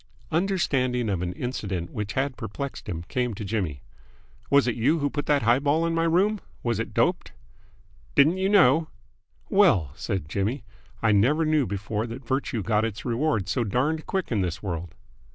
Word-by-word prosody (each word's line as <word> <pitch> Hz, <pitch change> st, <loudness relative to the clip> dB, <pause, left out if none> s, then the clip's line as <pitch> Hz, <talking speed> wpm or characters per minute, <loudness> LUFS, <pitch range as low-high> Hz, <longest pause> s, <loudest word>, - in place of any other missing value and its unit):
Understanding 135 Hz, -, +1 dB
of 95 Hz, -4 st, -1 dB
an 90 Hz, 0 st, -2 dB
incident 100 Hz, -8 st, -4 dB
which 105 Hz, -2 st, -4 dB
had 135 Hz, 0 st, -1 dB
perplexed 120 Hz, +2 st, -6 dB
him 85 Hz, -3 st, -4 dB
came 125 Hz, +2 st, -2 dB
to 105 Hz, -, -6 dB
Jimmy. 95 Hz, -, -2 dB, 0.7 s
"Was 140 Hz, -2 st, +4 dB
it 120 Hz, -, +2 dB
you 135 Hz, +9 st, +2 dB
who 145 Hz, -2 st, -1 dB
put 145 Hz, -, -3 dB
that 145 Hz, -4 st, +3 dB
high 120 Hz, +3 st, +4 dB
ball 150 Hz, +4 st, +1 dB
in 165 Hz, -, 0 dB
my 165 Hz, 0 st, +1 dB
room? 195 Hz, +6 st, +2 dB, 0.2 s
Was 120 Hz, -3 st, 0 dB
it 115 Hz, -, -3 dB
doped?" 180 Hz, 0 st, 0 dB, 0.8 s
"Didn't 155 Hz, +6 st, +5 dB
you 190 Hz, +1 st, +1 dB
know?" 160 Hz, -6 st, +5 dB, 0.6 s
"Well," 160 Hz, -, +4 dB
said 95 Hz, -1 st, -3 dB
Jimmy, 105 Hz, -, -2 dB, 0.4 s
"I 110 Hz, -, +4 dB
never 130 Hz, +11 st, +3 dB
knew 155 Hz, -4 st, +2 dB
before 100 Hz, +3 st, -3 dB
that 120 Hz, +3 st, -8 dB
virtue 130 Hz, -4 st, -1 dB
got 105 Hz, +2 st, +1 dB
its 115 Hz, -1 st, -4 dB
reward 120 Hz, -, 0 dB
so 120 Hz, +6 st, 0 dB
darned 140 Hz, +9 st, -1 dB
quick 190 Hz, -7 st, -2 dB
in 105 Hz, -4 st, +1 dB
this 90 Hz, 0 st, -3 dB
world. 85 Hz, -4 st, -4 dB
125 Hz, 180 wpm, -26 LUFS, 100-155 Hz, 0.8 s, Didn't